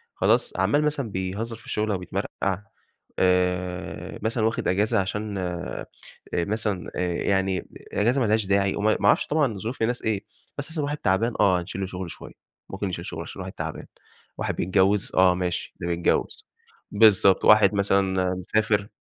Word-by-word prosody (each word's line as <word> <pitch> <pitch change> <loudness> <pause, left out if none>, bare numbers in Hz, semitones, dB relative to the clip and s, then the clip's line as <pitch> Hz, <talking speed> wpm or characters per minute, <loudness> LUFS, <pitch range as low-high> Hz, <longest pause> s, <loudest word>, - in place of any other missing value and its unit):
خلاص 485 -4 +2
عَمّال 145 +1 +2
مثلًا 145 -6 -1
بيهزَّر 100 +5 -3
في - - -17
الشُّغل 105 0 -1
أوبيِتْمَرْقَع، 95 +1 -3 0.6
آآ 90 0 0
مثلًا 110 0 0
واخد 115 - -1
إجازة 100 +3 +2
عشان 100 +2 -3
آآ 90 -1 -4 0.5
مثلًا 100 +1 -2
آآ 90 -1 -1
يعني 95 -1 0 0.3
إجازة 120 +6 +2
ما - - +3
لهاش 110 0 +2
داعي، 100 0 +2
وم 100 - -2
ما 110 -2 +3
اعرفش - - +4
طبعًا 145 -8 +1
ظّروف 115 +5 -5
الناس 120 +2 0
إيه، 105 -3 -1 0.3
بس 145 +2 -5
مثلًا 160 -2 -2
واحد 145 +1 -2
تعبان 110 +2 +1
آه، 90 -2 +4
هنشيل 90 +3 -6
له 95 - -2
شُغله 90 -1 -5
شوية، - - -10 0.4
ممكن 100 +1 -3
نشيل 90 - -5
شُغل - - -5
عشان - - -8
واحد - - -6
تعبان، - - -5 0.5
واحد - - -2
بيتجوّز 95 +2 +2
آه، 90 -1 +5
ماشي 90 -1 -3
ده 85 - -2
بيتجوّز، 85 0 0 0.4
بالضبط، 100 -3 +5
واحد 105 0 +7
مثلًا 95 -2 +1
مسافر 105 +2 0
100 Hz, 165 wpm, -25 LUFS, 95-110 Hz, 0.6 s, واحد